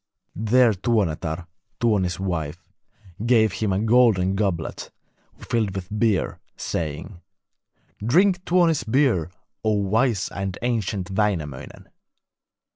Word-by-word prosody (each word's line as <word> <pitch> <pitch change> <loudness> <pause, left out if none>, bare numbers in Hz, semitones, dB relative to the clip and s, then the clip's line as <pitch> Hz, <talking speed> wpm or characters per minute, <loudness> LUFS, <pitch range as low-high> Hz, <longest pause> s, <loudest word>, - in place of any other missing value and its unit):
There 115 +3 +4
Tuonetar, 90 -6 -1 0.3
Tuoni's 100 -7 +1
wife, 85 -2 -4 0.6
gave 115 -4 +3
him 105 -1 -1
a 95 - +1
golden 110 -4 +3
goblet 95 -5 -2 0.5
filled 110 -5 -1
with 90 -2 -5
beer, 110 -4 +1 0.2
saying: 85 +4 -4 0.8
'Drink 180 - +3
Tuoni's 170 -6 +2
beer, 115 - +2 0.3
O 110 -1 +2
wise 105 +2 +1
and 95 -1 -4
ancient 105 -6 -1
Wainamoinen!' 90 -10 -2
105 Hz, 100 wpm, -23 LUFS, 90-115 Hz, 0.8 s, There